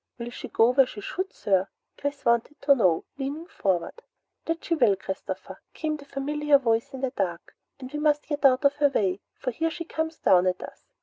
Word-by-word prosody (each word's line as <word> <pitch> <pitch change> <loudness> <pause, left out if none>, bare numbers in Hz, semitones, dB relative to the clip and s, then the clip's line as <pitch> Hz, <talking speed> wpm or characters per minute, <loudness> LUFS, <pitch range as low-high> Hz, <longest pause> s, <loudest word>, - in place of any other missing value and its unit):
"Will 235 0 -6
she - - -7
go 230 +2 +4
where 265 0 +5
she 215 - -9
should, 375 - -4
sir?" 190 -1 +1 0.3
Chris 285 0 -4
wanted 235 +5 +1
to 280 - +6
know, 185 -11 +2
leaning 285 +5 -4
forward. 200 - -2 0.4
"That 330 0 -3
she 340 - 0
will, 240 -11 +4
Christopher!" 190 0 -6
came 310 -2 -2
the 280 - -13
familiar 290 +1 +2
voice 230 -4 0
in 260 - -7
the 265 -2 -1
dark. 180 -8 -3 0.2
"And 260 +1 -9
we 295 - -2
must 300 -1 +2
get 295 -1 -3
out 265 +1 +5
of 280 +1 +4
her 290 -1 +4
way, 195 -7 0
for 255 - -3
here 325 +7 -1
she 335 +1 -6
comes 320 0 -3
down 180 0 +4
at 185 0 -1
us. - - -11
275 Hz, 210 wpm, -26 LUFS, 225-295 Hz, 0.4 s, to